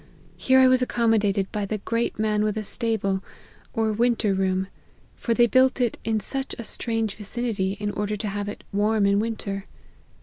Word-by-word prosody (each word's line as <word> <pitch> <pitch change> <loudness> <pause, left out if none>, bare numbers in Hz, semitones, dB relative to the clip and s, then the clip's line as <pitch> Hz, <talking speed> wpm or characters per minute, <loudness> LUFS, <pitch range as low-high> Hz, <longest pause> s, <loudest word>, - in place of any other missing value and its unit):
Here 260 0 +3
I 260 0 +7
was 255 0 +4
accommo 230 -3 +2
dated 200 -1 0
by 205 -1 -2
the 215 - -2
great 230 +3 -2
man 210 0 +1
with 215 0 0
a 215 - -2
stable, 200 -3 -1 0.5
or 225 -2 0
winter 230 -2 +2
room; 190 0 0 0.5
for 230 - -1
they 240 - +6
build 260 +2 +3
it 240 -3 0
in 220 -1 0
such 270 +6 -4
a 235 - -5
strange 225 -2 -2
vicinity, 210 -2 -2
in 205 0 -2
order 210 +1 -2
to 210 +1 -4
have 205 0 -3
it 205 - -8
warm 210 +1 +2
in 200 0 +3
winter. 210 -3 -3
215 Hz, 190 wpm, -25 LUFS, 200-230 Hz, 0.5 s, I